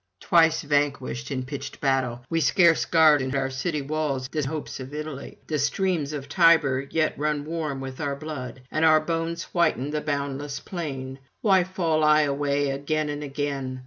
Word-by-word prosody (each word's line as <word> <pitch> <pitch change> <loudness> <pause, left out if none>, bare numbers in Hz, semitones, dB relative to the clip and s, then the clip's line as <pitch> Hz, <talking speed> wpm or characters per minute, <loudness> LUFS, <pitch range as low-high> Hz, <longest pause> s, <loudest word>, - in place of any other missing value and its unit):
Twice 165 -1 +3
vanquished 145 -3 -1
in 130 -2 -2
pitched 140 +2 -7
battle, 130 -3 0
we 165 +2 0
scarce 170 +2 +4
guard 155 -3 +5
in 130 +1 -2
our 135 -1 0
city 145 +3 -2
walls 140 -3 -2
the 155 - -2
hopes 150 +1 -4
of 130 +3 -8
Italy: 150 -2 -6
the 155 -2 -2
streams 160 0 0
of 145 -2 -5
Tiber 145 -5 +4
yet 160 -1 +1
run 150 -1 -1
warm 155 -4 -3
with 130 +2 -7
our 140 -2 -1
blood, 130 -4 -7
and 155 - 0
our 155 -1 +6
bones 165 +1 -2
whiten 155 -6 +1
the 150 0 -1
boundless 140 -1 -3
plain. 135 -7 -6 0.2
Why 190 -4 +4
fall 170 -4 0
I 150 0 +5
away 145 -1 0
again 150 +2 -1
and 145 0 -4
again? 140 -2 -3
145 Hz, 175 wpm, -25 LUFS, 135-160 Hz, 0.2 s, our